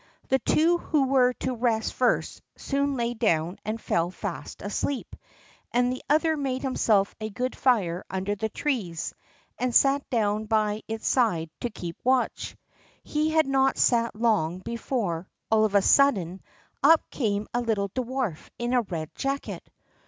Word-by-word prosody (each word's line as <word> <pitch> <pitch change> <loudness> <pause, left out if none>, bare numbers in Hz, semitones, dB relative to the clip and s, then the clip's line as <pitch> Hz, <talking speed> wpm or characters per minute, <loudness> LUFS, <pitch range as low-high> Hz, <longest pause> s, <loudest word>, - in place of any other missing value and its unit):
The 265 - +3
two 330 +8 +3
who 300 -5 +1
were 260 -2 +4
to 260 - -1
rest 225 -2 0
first 250 - 0 0.2
soon 280 0 -1
lay 240 -1 -1
down 180 -6 0
and 215 +1 -3
fell 170 -5 0
fast 185 0 -6
asleep; 240 +7 -3 0.6
and 245 +1 +2
the 255 - -6
other 315 +2 +3
made 270 -3 -2
himself 215 -6 +2
a 215 - -3
good 250 +4 -3
fire 190 -9 +1
under 190 +2 -2
the 220 +2 -2
trees, 220 - -2 0.5
and 250 -1 -1
sat 275 0 +4
down 215 -2 0
by 215 -1 +1
its 220 0 -4
side 175 -11 +1
to 240 - -2
keep 175 -6 -7
watch. 255 0 0 0.5
He 305 +1 0
had 315 0 +3
not 270 0 +2
sat 235 -2 +2
long 210 -7 +1
before, 195 -4 -3 0.2
all 220 -1 +5
of 205 -1 -1
a 200 - +5
sudden, 195 -11 +3 0.4
up 325 0 +5
came 210 -5 -1
a 240 - +1
little 215 -4 0
dwarf 250 - -3
in 240 +1 -2
a 250 - +4
red 165 -7 -5
jacket. 275 0 -4
235 Hz, 160 wpm, -26 LUFS, 200-265 Hz, 0.6 s, all